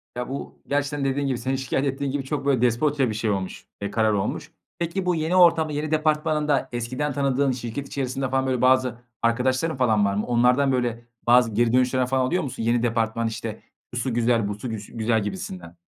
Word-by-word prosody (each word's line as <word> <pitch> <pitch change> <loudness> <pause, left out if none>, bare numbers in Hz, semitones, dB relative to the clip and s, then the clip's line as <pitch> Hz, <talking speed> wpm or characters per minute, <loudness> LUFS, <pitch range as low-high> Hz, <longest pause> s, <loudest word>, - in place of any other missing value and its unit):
Ya, 125 0 -4
bu 140 +1 -6
gerçekten 145 0 -1
dediğin 140 +1 0
gibi, 130 -3 0
senin 130 +3 -1
şikâyet 135 +1 -1
ettiğin 135 0 -2
gibi 140 0 -2
çok, 140 +1 -3
böyle, 135 -4 +2
despotça 130 +2 +2
bir - - -2
şey 110 +1 -1
olmuş, 95 -2 -3 0.2
eee, 100 - -3
karar 110 0 +2
olmuş. 100 -1 -2 0.3
Peki, 170 +3 -2
bu 180 -1 +2
yeni 160 +3 0
ortamda, 165 -4 +5
yeni 150 +1 -3
departmanında 155 -2 +1
eskiden 125 +5 -2
tanıdığın 140 -1 +1
şirket 125 +3 -5
içerisinde 135 -1 -2
falan 130 0 0
böyle, 130 -2 0
bazı 130 -2 +3 0.2
arkadaşların 130 +6 +1
falan 110 -5 +3
var 100 - +1
mı? 105 - -1
Onlardan, 125 +3 +3
böyle 120 -2 -1 0.2
bazı 120 -1 +5
geri 115 +2 +2
dönüşler 125 0 +2
falan 130 0 +1
alıyor 180 +7 0
musun? 130 -4 -5
Yeni 115 +1 +2
departman, 115 -1 0
işte, 115 -1 -5 0.3
şusu 125 +1 -1
güzel, 115 -2 +2
busu 105 +4 -5
güs 105 -2 -6
güzel 115 -1 +1
gibisinden? 90 -3 -6
130 Hz, 195 wpm, -24 LUFS, 115-140 Hz, 0.3 s, ortamda